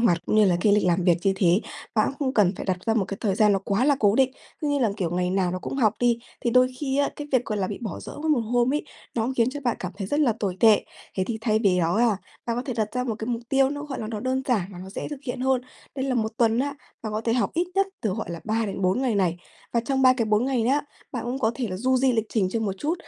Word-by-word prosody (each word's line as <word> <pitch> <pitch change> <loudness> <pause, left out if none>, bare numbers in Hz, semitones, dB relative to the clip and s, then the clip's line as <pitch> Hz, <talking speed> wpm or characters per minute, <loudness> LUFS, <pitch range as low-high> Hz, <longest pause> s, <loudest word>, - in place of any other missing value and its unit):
hoạt, 195 -8 +3
cũng 215 - +1
như 215 - +6
là 180 -3 +3
cái 205 +1 +4
lịch 210 - +3
làm 175 0 +2
việc 175 -2 +5
như 195 - +4
thế, 185 +1 +3 0.3
bạn 215 -2 +3
cũng 275 - -7
không 265 -2 -1
cần 195 -4 +4
phải - - -5
đặt 185 - +1
ra 225 - +2
một 210 -4 +2
cái 195 - -5
thời 200 -4 +1
gian 210 0 +4
nó 195 - +2
quá 200 +5 0
là 285 -1 +4
cố 205 -1 +4
định. 265 -1 +3 0.3
Cứ 300 - -1
như 285 -1 +1
là, 230 -5 +2
kiểu, 180 -5 -1
ngày 180 0 0
nào 185 -2 +1
nó 185 - -3
cũng 225 - -5
học 220 -6 +3
đi, 240 -1 +3 0.3
thì 240 - +2
đôi 255 +1 +5
khi 275 -1 -1
á, 285 - +3
cái 295 - -6
việc 250 -2 +3
gọi 210 -1 -2
là 190 - 0
bị 205 - -5
bỏ 210 -7 -5
dỡ - - -8
một 305 -5 +2
hôm 240 +3 +1
ấy 300 - -1 0.3
nó 230 +1 0
khiến 235 +1 +3
cho 290 +2 -6
bạn 245 -4 0
cảm 180 0 -4
thấy 195 -2 -4
rất 290 +8 0
là 265 -6 +4
tồi 190 -3 -1
tệ. 220 -2 +6 0.3
Thế 190 - +1
thì 225 -2 -3
thay 220 -2 +2
vì 195 -5 +2
đó 170 +2 +1
ha, 225 -3 +3 0.3
bạn 235 0 -1
có 245 - -1
thể 260 - -4
đặt 215 -2 0
ra 250 0 0
một 230 - -2
cái 220 +1 -6
mục 235 -1 -2
tiêu 270 0 +3
nó, 290 0 -4
gọi 275 -3 -5
là, 215 - -4
nó 215 -2 -4
đơn 260 +2 -1
giản 200 -7 +1
và 175 - -9
nó 190 +1 -9
dễ - - -5
thực 290 - -6
hiện 250 -1 -4
hơn. 260 -1 +2 0.3
Đấy 265 -1 -2
là 265 - 0
1 220 -2 0
tuần 230 -1 +3
á, 280 +2 -1 0.3
bạn 215 -2 -4
có 215 - -1
thể 230 0 0
học 245 +1 +1
ít 345 +2 +1
nhất 390 0 +3
từ, 215 - 0
gọi 220 -4 -4
là, 170 - -5
3 220 0 0
đến 195 0 -4
4 185 +6 +2
ngày 250 -4 +1
này, 180 -4 +1 0.4
và 235 - +2
trong 265 +2 0
3 255 -1 +7
cái 240 -3 0
4 215 +2 +2
ngày 260 -3 +1
nhá, 275 +5 +2 0.3
bạn 240 -2 -3
cũng 250 +2 -2
có 220 -5 +2
thể 235 -2 -3
là 185 - -4
du 255 +6 +2
di 255 0 +3
lịch 225 -1 0
trình 195 -5 +1
cho 225 +3 -1
một 200 -3 -1
chút. 310 +3 0
230 Hz, 325 wpm, -25 LUFS, 200-255 Hz, 0.4 s, 3